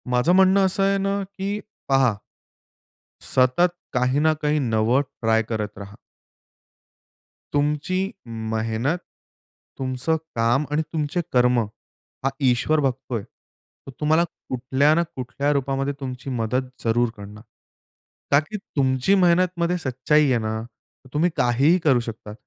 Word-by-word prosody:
माझं 125 Hz, +6 st, +2 dB
म्हणणं 190 Hz, +1 st, +5 dB
असं 190 Hz, +1 st, +1 dB
आहे 195 Hz, 0 st, +3 dB
ना, 195 Hz, +1 st, -1 dB
की 200 Hz, +1 st, -4 dB, 0.3 s
पहा 135 Hz, -4 st, +4 dB, 1.1 s
सतत 130 Hz, +8 st, +3 dB, 0.2 s
काही 125 Hz, +2 st, +2 dB
ना 155 Hz, +1 st, +3 dB
काही 150 Hz, 0 st, +1 dB
नवं 115 Hz, 0 st, +2 dB, 0.2 s
ट्राय 115 Hz, -1 st, +3 dB
करत 105 Hz, -2 st, -4 dB
राहा. 100 Hz, 0 st, -9 dB, 1.6 s
तुमची 150 Hz, +5 st, 0 dB, 0.5 s
मेहनत, 115 Hz, +8 st, -1 dB, 0.8 s
तुमचं 130 Hz, +4 st, -1 dB, 0.2 s
काम 120 Hz, +5 st, +2 dB
आणि 150 Hz, +1 st, +2 dB
तुमचे 155 Hz, +2 st, -1 dB
कर्म, 125 Hz, -1 st, +4 dB, 0.6 s
हा 135 Hz, -, +2 dB, 0.2 s
ईश्वर 140 Hz, +6 st, +2 dB
बघतोय. 130 Hz, -5 st, -2 dB, 0.6 s
तर -, -, -7 dB
तुम्हाला 155 Hz, +2 st, +3 dB, 0.3 s
कुठल्या 130 Hz, +4 st, +2 dB
ना 170 Hz, -, +3 dB
कुठल्या 135 Hz, +3 st, -2 dB
रूपामध्ये 135 Hz, 0 st, -1 dB
तुमची 130 Hz, 0 st, -6 dB
मदत 125 Hz, +1 st, -1 dB
जरूर 120 Hz, +1 st, +2 dB
करणार. 105 Hz, +1 st, -10 dB, 0.9 s
का 140 Hz, -, +7 dB
की 155 Hz, +8 st, -6 dB, 0.2 s
तुमची 130 Hz, +7 st, +3 dB
मेहनतमध्ये 180 Hz, -1 st, +2 dB
सच्चाई 150 Hz, +1 st, +2 dB
आहे 125 Hz, -, +3 dB
ना, 110 Hz, 0 st, -3 dB
तर 125 Hz, +2 st, -20 dB
तुम्ही 160 Hz, +4 st, +2 dB
काहीही 135 Hz, +9 st, +3 dB
करू 135 Hz, -5 st, +4 dB
शकता. 115 Hz, -2 st, -7 dB
135 Hz, 125 wpm, -23 LUFS, 120-155 Hz, 1.6 s, का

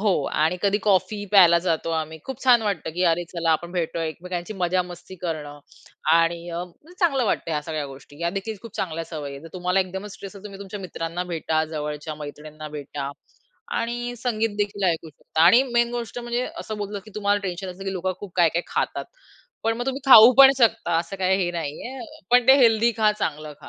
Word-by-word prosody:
हो 205 Hz, -1 st, +3 dB, 0.3 s
आणि 160 Hz, +3 st, +2 dB
कधी 205 Hz, 0 st, +2 dB
कॉफी 205 Hz, +1 st, +1 dB
प्यायला 175 Hz, -4 st, +7 dB
जातो 165 Hz, -1 st, 0 dB
आम्ही 160 Hz, 0 st, -7 dB
खूप 265 Hz, 0 st, -7 dB
छान 245 Hz, -3 st, +6 dB
वाटतं 200 Hz, -7 st, -2 dB
की 180 Hz, -, -1 dB
अरे 170 Hz, +1 st, 0 dB
चला 170 Hz, -2 st, 0 dB
आपण 170 Hz, +2 st, 0 dB
भेटतोय 165 Hz, -2 st, -2 dB
एकमेकांची 175 Hz, +4 st, -6 dB
मजा 180 Hz, -1 st, +1 dB
मस्ती 180 Hz, +1 st, -11 dB
करणं 150 Hz, -4 st, -4 dB, 0.5 s
आणि 170 Hz, +1 st, +2 dB
अ, 170 Hz, +1 st, -3 dB, 0.4 s
चांगलं 275 Hz, -8 st, +3 dB
वाटतं 185 Hz, -, -1 dB
ह्या 150 Hz, -2 st, 0 dB
सगळ्या 155 Hz, -2 st, -4 dB
गोष्टी. 140 Hz, +1 st, -13 dB
ह्या 170 Hz, 0 st, -1 dB
देखील 200 Hz, +4 st, -4 dB
खूप 230 Hz, -2 st, -11 dB
चांगल्या 165 Hz, -2 st, -3 dB
सवयी 150 Hz, -4 st, -6 dB
आहेत. 140 Hz, +1 st, -9 dB
जर 165 Hz, -, -10 dB
तुम्हाला 180 Hz, +1 st, +1 dB
एकदमच 190 Hz, +2 st, -5 dB
स्ट्रेस 200 Hz, 0 st, -10 dB
आहे 200 Hz, -, -13 dB
तुम्ही 200 Hz, -2 st, -9 dB
तुमच्या 200 Hz, +1 st, -7 dB
मित्रांना 170 Hz, -1 st, -4 dB
भेटा, 160 Hz, -1 st, 0 dB
जवळच्या 150 Hz, 0 st, -5 dB
मैत्रिणींना 150 Hz, +1 st, -9 dB
भेटा 145 Hz, -1 st, -6 dB, 0.7 s
आणि 240 Hz, +1 st, -3 dB
संगीतदेखील 215 Hz, -4 st, -1 dB
ऐकू 165 Hz, -1 st, -4 dB
शकता 160 Hz, +1 st, -2 dB
आणि 230 Hz, +9 st, +7 dB
मेन 235 Hz, 0 st, +3 dB
गोष्ट 240 Hz, 0 st, -4 dB
म्हणजे 240 Hz, +1 st, -2 dB
असं 215 Hz, -1 st, -6 dB
बोललं 205 Hz, 0 st, -4 dB
की 215 Hz, -, -13 dB
तुम्हाला 205 Hz, -1 st, +1 dB
टेन्शन 185 Hz, 0 st, -4 dB
असतं 185 Hz, +2 st, -10 dB
की 195 Hz, -, -2 dB
लोकं 185 Hz, 0 st, -2 dB
खूप 205 Hz, -3 st, -8 dB
काय-काय 170 Hz, -1 st, +3 dB
खातात. -, -, -2 dB, 0.6 s
पण 225 Hz, 0 st, +1 dB
मग 245 Hz, +1 st, -4 dB
तुम्ही 270 Hz, +1 st, -2 dB
खाऊ 240 Hz, -2 st, +10 dB
पण 270 Hz, -1 st, +11 dB
शकता, 225 Hz, -7 st, +2 dB
असं 170 Hz, +3 st, -4 dB
काही 190 Hz, 0 st, +2 dB
हे 175 Hz, -, -1 dB
नाहीये. 170 Hz, -, -5 dB, 0.3 s
पण 245 Hz, -1 st, +5 dB
ते 265 Hz, -, +10 dB
हेल्दी 230 Hz, -2 st, +5 dB
खा 215 Hz, -1 st, +5 dB
चांगलं 155 Hz, -7 st, -4 dB
खा -, -, -12 dB
185 Hz, 200 wpm, -24 LUFS, 165-215 Hz, 0.7 s, पण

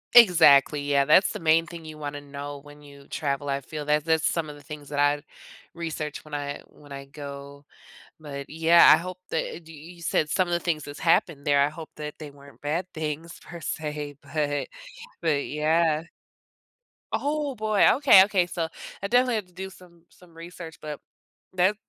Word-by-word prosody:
Exactly, 160 Hz, -, +7 dB
yeah, 140 Hz, -1 st, +3 dB
that's 155 Hz, +7 st, +5 dB
the -, -, -5 dB
main 165 Hz, 0 st, +3 dB
thing 170 Hz, -1 st, -9 dB
you 155 Hz, -1 st, -9 dB
wanna 145 Hz, -1 st, -5 dB
know 145 Hz, 0 st, -7 dB
when 145 Hz, +1 st, -15 dB
you 140 Hz, -1 st, -15 dB
travel, 145 Hz, -1 st, -2 dB
I 140 Hz, 0 st, -1 dB
feel 150 Hz, +2 st, -7 dB
that 150 Hz, +1 st, +1 dB
that's 160 Hz, -1 st, +2 dB
some 165 Hz, -3 st, 0 dB
of 150 Hz, -, -8 dB
the 145 Hz, -, -15 dB
things 145 Hz, 0 st, -9 dB
that 145 Hz, -, -5 dB
I'd 145 Hz, 0 st, +2 dB, 0.5 s
research 155 Hz, -3 st, -5 dB
when 155 Hz, -, -14 dB
I 145 Hz, -1 st, -4 dB
when 145 Hz, -1 st, -19 dB
I 140 Hz, 0 st, -7 dB
go, 140 Hz, 0 st, -9 dB, 0.6 s
but, 140 Hz, -3 st, -7 dB
yeah, 165 Hz, +2 st, +6 dB
I -, -, +5 dB
hope 185 Hz, +2 st, -6 dB
that 165 Hz, +1 st, -3 dB
d 165 Hz, -, -12 dB
y 160 Hz, +4 st, -12 dB
you 170 Hz, -, -16 dB
said 155 Hz, -1 st, +1 dB
some 185 Hz, +3 st, +1 dB
of 175 Hz, -, -2 dB
the 175 Hz, -, +2 dB
things 160 Hz, -4 st, -2 dB
that's 145 Hz, +1 st, -9 dB
happened 165 Hz, -3 st, +2 dB
there, 145 Hz, -1 st, +4 dB
I -, -, -1 dB
hope 155 Hz, +1 st, -10 dB
that 150 Hz, -1 st, -7 dB
they 155 Hz, -2 st, -7 dB
weren't 140 Hz, 0 st, -17 dB
bad 155 Hz, +5 st, -1 dB
things 160 Hz, +2 st, -5 dB
per 170 Hz, -1 st, -10 dB
se, 150 Hz, -2 st, -4 dB
but 145 Hz, -2 st, -2 dB, 0.5 s
but, 150 Hz, -4 st, +1 dB
yeah. 155 Hz, +1 st, +1 dB, 1.1 s
Oh, 290 Hz, -1 st, -1 dB
boy, 215 Hz, -2 st, +3 dB
okay, 260 Hz, -9 st, +8 dB
okay, 195 Hz, -3 st, +1 dB
so 170 Hz, -2 st, -3 dB, 0.3 s
I 200 Hz, -, -2 dB
definitely 245 Hz, +2 st, +3 dB
have 215 Hz, -3 st, -2 dB
to 180 Hz, -, -25 dB
do 190 Hz, +2 st, -6 dB
some 175 Hz, -3 st, -18 dB
some 175 Hz, -2 st, -21 dB
research, 165 Hz, -1 st, -9 dB
but 150 Hz, -2 st, -6 dB, 0.5 s
that 185 Hz, +3 st, +3 dB
155 Hz, 195 wpm, -26 LUFS, 145-170 Hz, 1.1 s, okay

